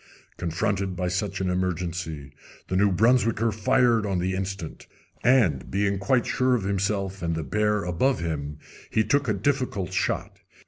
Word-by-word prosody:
Confronted 95 +2 -1
by 90 0 -1
such 95 +2 -2
an 95 - 0
emergency 85 -5 -3 0.4
the 95 - -1
New 100 +1 +4
Brunswicker 115 +2 +3
fired 115 +2 +3
on 100 -3 -1
the 90 +2 -1
instant, 95 -3 -5 0.4
and, 115 - +3
being 100 0 0
quite 125 +3 +2
sure 130 0 +2
of 115 - -2
himself 100 -1 -1
and 85 -1 -1
the 80 - -2
bear 105 +6 +1
above 90 +10 +1
him, 75 -3 -3 0.3
he 110 - +2
took 140 +3 +1
a 110 - +2
difficult 105 - -1
shot. - - -1
100 Hz, 155 wpm, -25 LUFS, 90-110 Hz, 0.4 s, New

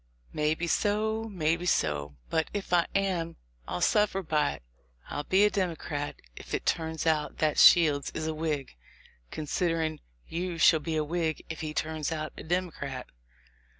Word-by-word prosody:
Maybe 155 +3 0
so, 215 +5 +1
maybe 170 -1 0
so; 75 - 0 0.2
but, 160 -1 +1
if 200 -3 -3
I 175 -1 +4
am, 180 -4 0 0.3
I'll 90 - -3
suffer 210 -2 +2
by 150 - +1
it; 70 - -12 0.5
I'll 145 0 -3
be 190 +2 +4
a 210 - +3
Democrat 160 -6 -2 0.2
if - - -5
it - - -4
turns 160 -1 -1
out 155 -2 +1
that 155 -1 +1
Shields 150 -5 +6
is 155 - -2
a 160 - -1
Whig, 155 - -3 0.5
considerin' 160 - -1 0.3
you 175 0 -3
shall 160 0 +6
be 160 +1 -3
a 155 - +2
W 170 +3 -2
T 165 - +2
hig 155 - -4
if 160 - -5
he 155 -1 -4
turns 155 0 -2
out 155 -1 -3
a - - -8
Democrat." 160 -7 -3
160 Hz, 170 wpm, -29 LUFS, 150-175 Hz, 0.5 s, Shields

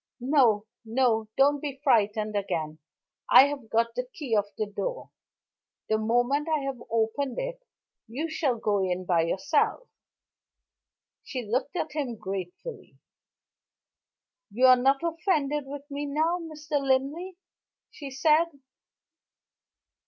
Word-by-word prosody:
No! 245 -5 +3 0.2
no! 225 -2 +1
don't 285 +1 +4
be 280 -3 -5
frightened 215 -5 +2
again. 160 -6 -2 0.5
I 255 +2 +9
have 280 -6 -5
got 230 +1 +1
the 250 +1 -3
key 270 -8 -2
of 205 -1 +2
the 215 - 0
door. - - -5 0.8
The 220 - +2
moment 245 +7 +1
I 315 - +2
have 270 -3 -4
opened 230 +4 -1
it, - - -4 0.5
you 270 +9 -3
shall 300 -6 0
go 210 -2 0
in 185 0 -2
by 175 -2 +3
yourself." 195 - 0 1.4
She 255 -2 -5
looked 250 - -2
at 320 -3 -2
him 275 -6 -3
gratefully. 195 - -7 1.5
"You 245 +6 +3
are 255 0 +9
not 270 +4 +2
offended 310 -4 0
with 280 0 -7
me 290 +1 -3
now, 320 +5 +1
Mr. 305 -3 -3
Linley," 280 +7 -1 0.5
she 285 -3 -8
said. 305 +5 +3
265 Hz, 125 wpm, -27 LUFS, 220-300 Hz, 1.5 s, I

